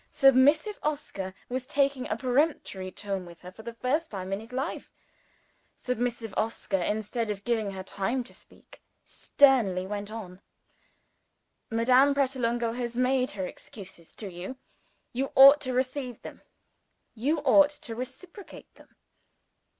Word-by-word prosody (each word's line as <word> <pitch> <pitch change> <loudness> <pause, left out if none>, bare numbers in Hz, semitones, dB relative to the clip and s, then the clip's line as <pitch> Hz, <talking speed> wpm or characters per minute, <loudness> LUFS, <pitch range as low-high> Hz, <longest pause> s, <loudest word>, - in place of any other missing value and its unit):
Submissive 290 - +4
Oscar 280 -11 -3 0.2
was 255 +1 -4
taking 275 -2 0
a 215 - -1
peremptory 250 - 0
tone 195 -1 -4
with 170 -1 -13
her 180 - -9
for 205 - -13
the 230 +1 -8
first 275 +8 -1
time 190 -2 -5
in 195 - -2
his 225 +3 -12
life. 270 +5 -4 0.9
Submissive 240 -3 -3
Oscar, 215 -2 -1
instead 220 +4 -2
of 205 -1 -4
giving 225 -3 0
her 190 -1 -6
time 200 +7 -2
to 240 - -10
speak, - - -18 0.2
sternly 230 -10 +3
went 205 +1 -5
on. 195 -4 -8 1.3
"Madame 255 +5 +4
Pratolungo 240 -4 0
has 240 -1 -4
made 255 +1 +2
her 190 - -2
excuses 185 -3 -11
to 200 -4 -7
you. 185 +9 -7 0.6
You 265 +3 -2
ought 275 +2 +9
to 255 - -3
receive 255 -1 -2
them; - - -10 0.7
you 275 +8 0
ought 290 +1 +6
to 290 -5 -8
reciprocate 265 - -9
them. - - -21
240 Hz, 140 wpm, -28 LUFS, 205-270 Hz, 1.3 s, ought